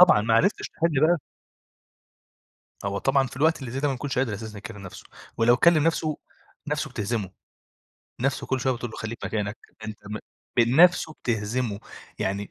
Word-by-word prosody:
طبعًا 180 -12 +8
معرفتش 115 - +2
تحل 160 -4 0
بقى 175 +1 +4 1.7
هو 100 0 -1
طبعًا 135 +1 +2
في 125 - -10
الوقت 160 +2 +3
اللي 125 -4 -6
زي 135 - -2
ده 145 - +1
ما 135 - 0
بيكونش 135 0 -4
قادر 125 -5 +1
أساسًا 110 0 -6
يكلم 105 +1 -8
نَفسه، 90 - -9 0.3
ولو 120 +1 +5
كلم 165 -1 +5
نَفسه، 155 -2 +1 0.5
نَفسه - - -1
بتهزمه، 105 -2 -2 0.9
نَفسه 135 +1 0
كُلّ 130 -1 0
شوية 130 0 +2
بتقول 120 -1 -5
له - - -9
خليك 110 +2 -5
مكانك، 105 0 -2 0.3
أنت 110 -1 -6
م 105 +1 -4 0.4
ب - - +6
نَفسه 155 +7 +5
بتهزمه، 110 -1 -1 0.4
يعني 100 +1 -2
120 Hz, 170 wpm, -26 LUFS, 110-140 Hz, 1.7 s, طبعًا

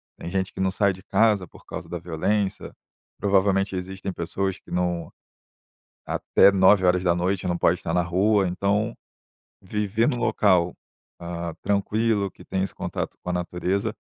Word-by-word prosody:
tem 85 - -7
gente 95 0 -2
que - - -10
não 95 0 +2
sai 100 0 +2
de 95 - -13
casa 105 -5 +2
por - - -18
causa - - -7
da 85 - -3
violência, 95 +5 -1 0.5
provavelmente 95 -1 +2
existem 95 +1 -5
pessoas 95 +3 -2
que - - -20
não 90 -2 -1 1.0
até 100 - +4
21h 90 -1 +3
não 85 0 0
pode 85 +1 +2
estar 80 - -3
na 90 0 +2
rua, 95 +3 +2
então, 100 +5 0 0.7
viver 105 +3 0
no - - +1
local, 90 -7 +2 0.5
hã, 85 -1 -5
tranquilo, 100 0 +1
que - - -16
tem 95 0 -1
esse 95 - -4
contato - - -4
com 90 - -6
a - - 0
natureza, 90 +4 -1
95 Hz, 155 wpm, -24 LUFS, 90-100 Hz, 1.0 s, até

